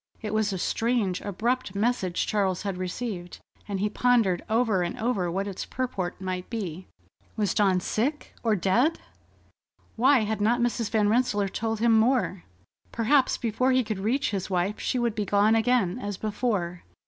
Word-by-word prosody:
It 215 -1 -3
was 215 -1 +1
a 190 - -2
strange, 225 -1 0
abrupt 220 +1 -2
message 200 -4 0
Charles 190 -4 0
had 200 -2 -2
received, 185 -1 -4 0.3
and 200 -2 -3
he 205 - +1
pondered 220 -5 +2
over 220 -4 +2
and 175 0 -3
over 215 -7 0
what 190 +3 -2
its 195 -2 -5
purport 220 -9 -3
might 185 -1 -4
be. 185 -6 -5 0.5
Was 205 -4 +1
Dawn 195 -3 +3
sick, 260 - -2
or 225 -2 +2
dead? 230 - +2 1.0
Why 260 +2 +5
had 215 -1 -2
not 235 +4 +3
Mrs. 240 -2 0
Van 215 -2 +2
Rensselaer 210 -3 +1
told 225 +2 -3
him 235 0 +4
more? 220 -5 +2 0.5
Perhaps 255 +4 +2
before 245 +3 +1
he 255 0 +3
could 215 -3 -4
reach 240 +7 0
his 195 -2 -3
wife 185 +2 -1
she 255 - -1
would 240 -2 0
be 210 -1 -1
gone 205 +2 +3
again, 225 -3 +2
as 205 -3 -4
before. 205 -5 -2
215 Hz, 170 wpm, -26 LUFS, 190-240 Hz, 1.0 s, Why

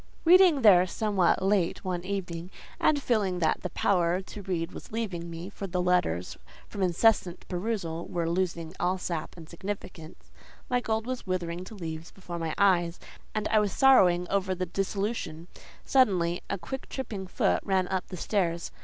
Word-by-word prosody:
Reading 350 -5 +6
there 185 -4 +7
somewhat 195 -3 +1
late 190 -3 +1
one 180 -2 -2
evening, 180 -3 -4 0.3
and 300 -2 +3
feeling 210 -9 0
that 160 -3 +1
the 180 - -3
power 175 -2 +1
to 200 +2 -9
read 180 -3 -2
was - - -10
leaving 190 -7 -3
me—for 180 +4 -6
the 180 0 -2
letters 180 - 0 0.3
from 200 - -6
incessant 185 0 +2
perusal 175 -3 -3
were 170 -1 -2
losing 170 -1 -1
all 180 +1 +1
sap 170 -2 -4
and 165 -2 -10
significance: 175 -2 -8 0.4
my 250 - +3
gold 220 -1 -1
was 255 -4 -5
withering 180 -1 -2
to 220 - -10
leaves 165 -3 -6
before 175 -3 -8
my 165 -1 -3
eyes, 180 -4 +3 0.4
and 215 - 0
I 215 0 +4
was 205 -2 0
sorrowing 180 -10 +5
over 190 -1 +1
the 185 0 -2
disillusion—suddenly 190 - -1
a 200 - -1
quick 225 +10 -7
tripping 210 -8 -5
foot 90 - +1
ran 190 -2 +1
up 190 -1 -2
the 185 - -7
stairs. 170 -4 -1
185 Hz, 160 wpm, -28 LUFS, 170-205 Hz, 0.4 s, there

